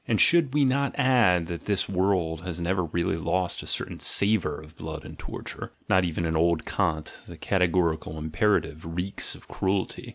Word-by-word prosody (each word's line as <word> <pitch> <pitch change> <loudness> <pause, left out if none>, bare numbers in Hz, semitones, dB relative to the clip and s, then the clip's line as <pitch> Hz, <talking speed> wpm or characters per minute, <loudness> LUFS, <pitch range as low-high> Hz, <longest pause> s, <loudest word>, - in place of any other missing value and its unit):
And 110 - +1
should 160 -5 +5
we 145 -2 +4
not 140 +1 +1
add 120 - +4
that 85 0 -6
this 100 -3 +1
world 90 -4 0
has 90 -1 -5
never 90 +1 0
really 85 0 -1
lost 90 +2 -1
a - - -10
certain - - -2
savour 100 -8 +1
of 80 +1 -14
blood 80 0 -7
and - - -9
torture - - -7
(not 95 0 +4
even 85 0 -2
in 80 0 -1
old 85 0 +2
Kant: 80 -6 -1
the - - -10
categorical 85 -4 0
imperative 80 0 0
reeks 90 +3 -3
of - - -16
cruelty). 95 0 -2
90 Hz, 175 wpm, -26 LUFS, 80-100 Hz, -, should